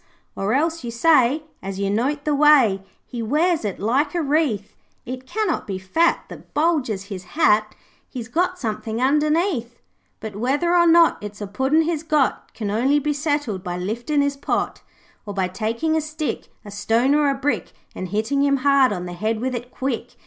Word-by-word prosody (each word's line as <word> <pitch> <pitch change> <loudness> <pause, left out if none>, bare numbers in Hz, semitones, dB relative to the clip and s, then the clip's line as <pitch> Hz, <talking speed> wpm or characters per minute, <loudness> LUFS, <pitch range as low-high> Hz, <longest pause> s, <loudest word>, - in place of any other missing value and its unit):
'Or 200 +5 0
else 325 +1 0
you 240 - -4
say, 265 +3 +3 0.2
As 195 0 -5
you 200 0 -1
note 275 +7 -1
the 300 - +1
way 280 -9 +5 0.2
He 240 - -6
wears 310 +7 +1
it 205 -3 -3
like 265 - 0
a 345 - +1
wreath, 280 -9 0 0.3
"It 255 +1 -7
cannot 435 +8 -1
be 195 -2 -3
fat 320 - +1
That - - -13
bulges 290 - +1
his 195 -3 -7
hat; 215 -8 +3 0.3
He's 240 -4 -6
got 360 +8 0
something 220 -3 -3
underneath." 295 - +1 0.4
'But 220 -2 -7
whether 285 +11 +1
or 345 -1 +5
not 335 0 +5
It's 210 0 -8
a 205 - -4
Puddin' 265 +10 +1
he's 320 -2 -1
got 305 -4 0
Can 210 -3 -3
only 260 +7 +2
be 295 +1 0
settled 290 - -2
by 175 -2 -4
lifting 235 +10 -1
his 285 0 -1
pot. 275 - -2 0.4
Or 205 -1 -7
by 190 -2 +1
taking 230 - -1
a 320 - +2
stick, 310 0 -4 0.2
A 205 - -9
stone 225 +6 +1
or 295 -1 +3
a 275 - 0
brick, 275 +2 -2 0.2
And 185 - -5
hitting 220 +9 0
him 280 -1 +3
hard 275 -3 +5
on 180 -3 -3
the 175 - -6
head 215 +5 -2
with 255 +2 -2
it 245 0 -5
quick. 255 -2 -4
260 Hz, 190 wpm, -22 LUFS, 215-300 Hz, 0.4 s, way